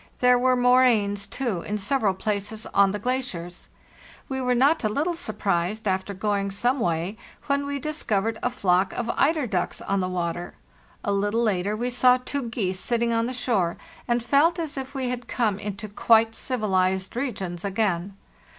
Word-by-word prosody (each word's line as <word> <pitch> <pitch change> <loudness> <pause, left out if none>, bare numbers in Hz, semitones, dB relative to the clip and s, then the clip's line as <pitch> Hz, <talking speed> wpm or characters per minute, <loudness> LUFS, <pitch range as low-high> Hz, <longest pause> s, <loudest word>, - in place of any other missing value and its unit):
There 250 0 +4
were 255 0 +3
moraines, 245 -5 +3
too, 235 -10 -2
in 210 +4 -3
several 210 -2 +1
places 210 +2 -2
on 200 -1 +5
the 205 - -2
glaciers. 205 -7 -4 0.6
We 265 -1 -3
were 250 -1 +1
not 280 +5 +3
a 215 - +2
little 300 +11 0
surprised, 210 - -1
after 190 +1 -1
going 200 0 -1
some 240 +7 +1
way, 175 +2 -1 0.3
when 280 0 0
we 285 0 -2
discovered 225 -7 -1
a 245 - +1
flock 190 -5 +1
of 235 -1 -2
eider 305 0 +2
ducks 235 - -2
on 195 0 -1
the 185 -1 -1
water. 175 -1 -3 0.5
A 200 - -1
little 205 +4 +1
later 205 -1 0
we 245 +2 -1
saw 250 +1 +5
two 255 0 -4
geese 190 -5 -1
sitting 235 +1 0
on 230 0 +1
the 255 - -4
shore, 200 -9 0 0.3
and 240 -1 +1
felt 290 +8 +3
as 320 -4 -3
if 270 +1 -6
we 260 -2 -1
had 245 -1 -4
come 215 -5 0
into 210 +1 -5
quite 225 +2 +3
civilized 190 -6 0
regions 195 -9 -3
again. 195 -2 -1
220 Hz, 175 wpm, -25 LUFS, 195-250 Hz, 0.6 s, on